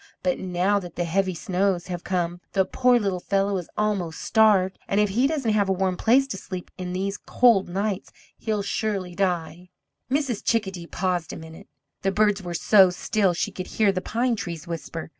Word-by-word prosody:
But 270 - 0
now 185 +2 +1
that 175 -3 -10
the 175 - -1
heavy 185 +2 0
snows 185 +1 0
have 175 -1 -5
come, 175 -1 -2
the 190 -1 +3
poor 250 +5 +3
little 195 -5 -1
fellow 195 +2 0
is 180 - -6
almost 200 -6 -1
starved, 205 -4 +3
and 200 - +1
if 210 -1 +3
he 240 +7 +2
doesn't 275 -8 0
have 200 -2 +2
a - - +3
warm 190 -1 0
place 250 +8 +4
to 195 - -4
sleep 185 -2 -7
in 180 -1 -5
these 195 +2 -2
cold 230 -7 +3
nights, 195 +2 -2 0.2
he'll 215 -2 -2
surely 200 -3 -2
die!" 175 -1 -2 0.4
Mrs. 270 -5 -1
Chickadee 190 -7 -1
paused 180 -3 -2
a - - -6
minute. 160 +4 -11 0.3
The 195 - +1
birds 210 0 +2
were 175 -2 -5
so 190 +2 +6
still 195 +2 +1
one - - -2
could 185 - -6
hear 215 -3 +2
the 185 -1 -3
pine 235 +4 0
trees 170 -5 -6
whisper. 165 -1 -6
195 Hz, 195 wpm, -24 LUFS, 180-210 Hz, 0.4 s, so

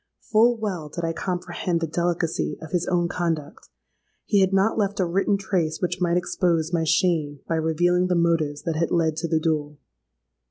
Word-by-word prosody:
Full 230 +2 +4
well 185 -9 -4
did 170 +2 -4
I 165 - -1
comprehend 175 -1 -2
the 165 - -1
delicacy 170 0 -1
of 160 -2 -10
his 180 -1 0
own 175 -1 +1
conduct: 165 -4 -3 0.6
he 205 - +2
had 190 -1 +3
not 195 +3 +2
left 205 -2 -1
a 185 - +3
written 195 +3 +1
trace 175 -5 -1
which 180 0 -2
might 175 0 +2
expose 170 -2 0
my 165 -1 +2
shame 160 -3 +1
by - - -1
revealing 175 +3 +2
the 180 - +1
motives 165 -4 +1
that 165 - -2
had 165 +1 +1
led 160 -2 +1
to 170 - -2
the 160 -1 +1
duel! 150 -2 -1
170 Hz, 190 wpm, -24 LUFS, 160-180 Hz, 0.6 s, Full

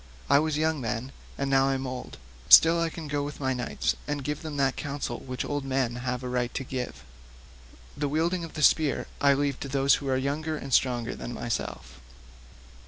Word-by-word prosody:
I 140 - +7
was 155 0 0
then 155 -1 0
young, 115 +3 -3 0.3
and 140 - -1
now 135 0 +3
I 135 - +1
am 135 0 -3
old; 130 -1 -6 0.3
still 165 - +8
I 165 - +1
can 160 -1 -7
go 145 0 -1
with 145 +1 -5
my 130 -2 0
knights 125 -2 -1
and 145 -1 -2
give 150 +2 -3
them 155 -3 -6
that 135 -1 +2
counsel 140 -4 -4
which 130 -1 -5
old 145 -1 -2
men 130 -3 -1
have 125 0 -3
a - - -3
right 125 -1 -1
to 135 - -2
give. 125 - -5 0.9
The 145 -1 -1
wielding 170 +4 0
of 165 - -8
the 155 - -2
spear 155 -2 +3 0.2
I 140 -1 +5
leave 140 -1 -1
to 140 - -5
those 135 0 +3
who 140 - -5
are 130 - +2
younger 150 +4 -2
and 135 -3 -6
stronger 120 -2 +2
than 120 - -6
myself." 70 - -4
135 Hz, 210 wpm, -27 LUFS, 125-150 Hz, 0.9 s, still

